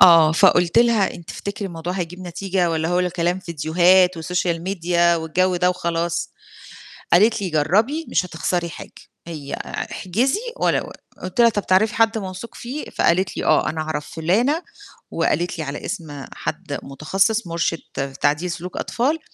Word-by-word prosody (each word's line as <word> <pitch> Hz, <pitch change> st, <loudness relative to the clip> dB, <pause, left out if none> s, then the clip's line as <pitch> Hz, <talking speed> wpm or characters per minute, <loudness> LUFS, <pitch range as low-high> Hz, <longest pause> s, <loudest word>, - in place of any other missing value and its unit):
آه، 165 Hz, -3 st, +8 dB
فقُلت 170 Hz, +4 st, +4 dB
لها: 235 Hz, -5 st, +3 dB
"إن 170 Hz, -, -11 dB
تفتكري 200 Hz, +4 st, -5 dB
الموضوع 170 Hz, -1 st, -5 dB
هيجيب 180 Hz, -1 st, -4 dB
نتيجة 180 Hz, 0 st, -1 dB
والّا 160 Hz, 0 st, -1 dB
هو 175 Hz, +1 st, +2 dB
ل 180 Hz, 0 st, 0 dB
كلام 175 Hz, +1 st, 0 dB
فيديوهات 175 Hz, +2 st, +3 dB
وسوشيال 170 Hz, 0 st, -1 dB
ميديا 175 Hz, -2 st, +2 dB
والجَو 180 Hz, +3 st, +1 dB
ده 180 Hz, +1 st, +3 dB
وخلاص؟" 170 Hz, -1 st, -2 dB, 0.8 s
قالت 210 Hz, +5 st, +5 dB
لي: 190 Hz, -, -2 dB
"جرّبي 210 Hz, -, +1 dB
مش -, -, +1 dB
هتخسري 175 Hz, 0 st, -2 dB
حاجة. -, -, -10 dB, 0.4 s
هي 150 Hz, -4 st, -7 dB
أع -, -, -4 dB
احجزي 235 Hz, -, 0 dB, 0.2 s
ولا -, -, +2 dB
ول -, -, -10 dB, 0.3 s
آآ" -, -, -17 dB
قُلت 185 Hz, +5 st, -6 dB
لها: 235 Hz, -, +7 dB
"طَب 205 Hz, -2 st, -3 dB
تعرفي 200 Hz, +4 st, +3 dB
حد 225 Hz, 0 st, +3 dB
موثوق 190 Hz, +2 st, -7 dB
فيه؟" 265 Hz, +6 st, -6 dB
فقالت 185 Hz, +2 st, +1 dB
لي: -, -, -2 dB
"آه، -, -, +3 dB
أنا 155 Hz, 0 st, -3 dB
عرف 155 Hz, -1 st, -3 dB
فُلانة." 230 Hz, -, +1 dB, 0.5 s
وقالت 175 Hz, 0 st, 0 dB
لي 160 Hz, -, -3 dB
على 140 Hz, 0 st, -6 dB
اسم 150 Hz, -9 st, -6 dB
حد -, -, -4 dB
متخصص 190 Hz, -, 0 dB
مُرشد 165 Hz, -5 st, -3 dB
تعديل 155 Hz, +5 st, +1 dB
سلوك 175 Hz, +1 st, -6 dB
أطفال، 280 Hz, +7 st, 0 dB
180 Hz, 165 wpm, -21 LUFS, 165-195 Hz, 0.8 s, آه